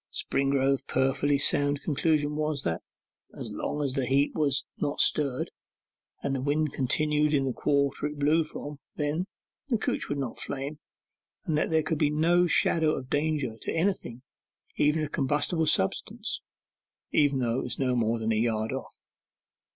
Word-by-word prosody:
Springrove's 135 0 +1
perfectly 135 +2 +2
sound 145 0 +2
conclusion 150 -1 +1
was, 150 -2 -1
that 85 0 -1 0.6
as - - -6
long 150 - -3
as 135 -2 0
the 135 -3 -1
heap 140 +3 +2
was 140 -3 +1
not 145 -1 -2
stirred, 140 -4 +2 0.7
and 140 - -1
the 135 - -1
wind 145 +1 0
continued 150 +3 +2
in 135 -1 +2
the 130 - -1
quarter 140 +1 +1
it 150 0 -7
blew 150 +3 +3
from 145 -1 -8 0.2
then, 150 +5 -1 0.4
the 235 - +3
couch - - -2
would 145 - -1
not 135 -4 -4
flame, 140 +2 -4 0.7
and 160 - 0
that 155 - +1
there 160 -1 +2
could 155 -1 -2
be 150 - +3
no 170 +4 +3
shadow 160 -2 +3
of 130 0 -7
danger 145 -6 0
to - - -3
anything, 165 -9 -1 0.5
even 150 +2 +2
a - - -1
combustible 150 +4 0
substance, 95 - 0 0.7
though 130 -5 +2
it 125 - -1
were 135 - +1
no 125 -1 +1
more 115 -1 +1
than 110 0 -1
a - - +2
yard 110 0 0
off. - - -7
145 Hz, 165 wpm, -28 LUFS, 135-155 Hz, 0.7 s, blew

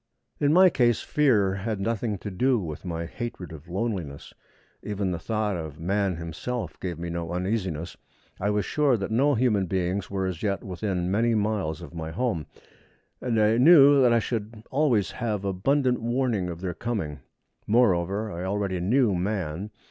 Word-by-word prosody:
In 145 0 +3
my 185 +2 +7
case 120 -5 +2
fear 110 -10 +2
had 100 +2 -3
nothing 110 +1 -1
to 100 +2 -7
do 125 +7 +2
with 80 -5 -6
my 85 -1 -3
hatred 95 -1 -6
of 80 +1 -11
loneliness. 95 -7 -4 0.5
Even 100 -2 -2
the 85 - -3
thought 105 +2 -1
of 80 -3 -6
man 95 +2 0
himself 85 +9 -5
gave 90 -4 -4
me 85 0 -5
no 85 0 -4
uneasiness. 90 -3 -2 0.4
I 100 - 0
was 105 0 0
sure 145 -5 +2
that 100 +1 -4
no 140 +6 +3
human 110 -6 +2
beings 95 +1 -1
were 95 -1 -2
as 90 -3 -4
yet 100 -2 -1
within 90 -1 -2
many 115 +3 +2
miles 100 -6 -1
of 85 - -10
my 80 -1 -5
home, 100 -3 -2 0.7
and 115 -3 0
I 110 +1 +4
knew 140 -1 +8
that 125 -2 +5
I 115 - +5
should 110 -1 -3
always 125 - +2
have 105 -4 -3
abundant 125 +7 +1
warning 120 -6 0
of 85 0 -7
their 90 -2 -3
coming. 95 -10 -3 0.5
Moreover, 105 -2 +2
I 85 0 -5
already 95 -1 -1
knew 110 +4 +2
man. 95 -1 -2
100 Hz, 170 wpm, -26 LUFS, 90-115 Hz, 0.7 s, knew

